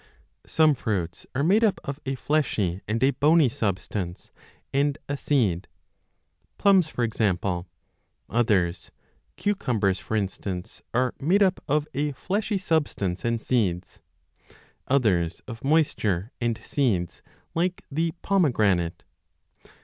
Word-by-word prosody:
Some 155 -1 +4
fruits 95 -9 -3
are 140 - +1
made 200 +8 +4
up 215 -4 +3
of 140 +1 -5
a 135 - 0
fleshy 115 - 0
and 115 +4 0
a 135 - +5
bony 150 +2 +4
substance 95 -4 -3 0.4
and 140 +1 +2
a 145 - -1
seed, 110 - +1 0.9
plums 190 -5 +4
for 125 - -2
example; 95 -5 0 0.6
others, 95 -8 +1 0.5
cucumbers 115 - 0
for 110 - -4
instance, 95 -2 -4
are 125 +1 +1
made 185 +9 +3
up 190 -2 +1
of 150 +1 +1
a 145 +1 -1
fleshy 200 - -1
substance 145 - -1
and 115 0 0
seeds, 95 -8 -1 0.9
others 95 -11 +1
4 - - -7
of 115 - -13
moisture 120 - +1
and 120 -2 0
seeds 100 - 0 0.3
like 180 +2 -1
the 165 +3 0
pomegranate. 105 - +2
120 Hz, 120 wpm, -26 LUFS, 95-150 Hz, 0.9 s, a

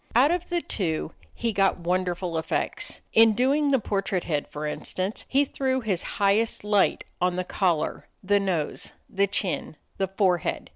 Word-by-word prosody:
Out 265 +6 +6
of 355 0 -2
the 345 -1 0
two 160 - -2 0.2
he 230 -2 -2
got 195 -1 +3
wonderful 180 0 -1
effects. 160 - -2
In 225 0 +7
doing 275 +6 +2
the 275 - +4
portrait 195 -4 -1
head, 150 -4 -1
for 150 +1 -6
instance, 185 +6 -3
he 280 +2 +3
threw 265 -1 -1
his 200 -7 -1 0.2
highest 205 +2 +2
light 210 -2 +2 0.2
on 180 0 +2
the 185 - -1
collar, 180 -4 0 0.2
the 205 +1 +3
nose, 180 -6 -2
the 200 +1 +1
chin, 190 -4 -2 0.2
the 195 - 0
forehead. 185 -3 0
195 Hz, 160 wpm, -26 LUFS, 180-230 Hz, 0.2 s, In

